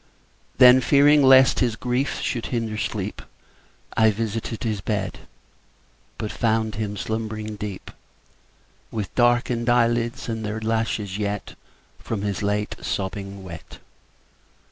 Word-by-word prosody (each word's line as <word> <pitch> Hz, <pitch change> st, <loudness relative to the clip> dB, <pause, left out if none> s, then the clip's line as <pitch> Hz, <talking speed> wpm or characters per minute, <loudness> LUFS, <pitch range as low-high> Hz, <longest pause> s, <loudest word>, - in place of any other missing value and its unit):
Then, 125 Hz, +1 st, +8 dB
fearing 145 Hz, +3 st, +5 dB
lest 130 Hz, -1 st, +6 dB
his 120 Hz, -4 st, +1 dB
grief 125 Hz, +4 st, -1 dB
should 120 Hz, -3 st, -2 dB
hinder 115 Hz, -3 st, -2 dB
sleep, -, -, -3 dB, 0.7 s
I 110 Hz, 0 st, +5 dB
visited 110 Hz, +1 st, -3 dB
his 110 Hz, -4 st, -2 dB
bed, 100 Hz, -2 st, -3 dB, 1.0 s
But 105 Hz, -, -4 dB
found 110 Hz, -1 st, 0 dB
him 105 Hz, -1 st, -4 dB
slumbering 110 Hz, 0 st, -4 dB
deep, 105 Hz, -2 st, -7 dB, 1.0 s
With 105 Hz, -3 st, -5 dB
darken'd 120 Hz, -1 st, +2 dB
eyelids, 120 Hz, +1 st, +1 dB
and 115 Hz, -1 st, -3 dB
their 105 Hz, +1 st, -3 dB
lashes 110 Hz, -3 st, -2 dB
yet 105 Hz, -1 st, -2 dB
10 -, -, -14 dB, 0.4 s
From 110 Hz, -3 st, -4 dB
his 100 Hz, -2 st, -2 dB
late 105 Hz, +1 st, -1 dB
sobbing 100 Hz, 0 st, -4 dB
wet. 85 Hz, -3 st, -10 dB
110 Hz, 120 wpm, -23 LUFS, 105-120 Hz, 1.0 s, Then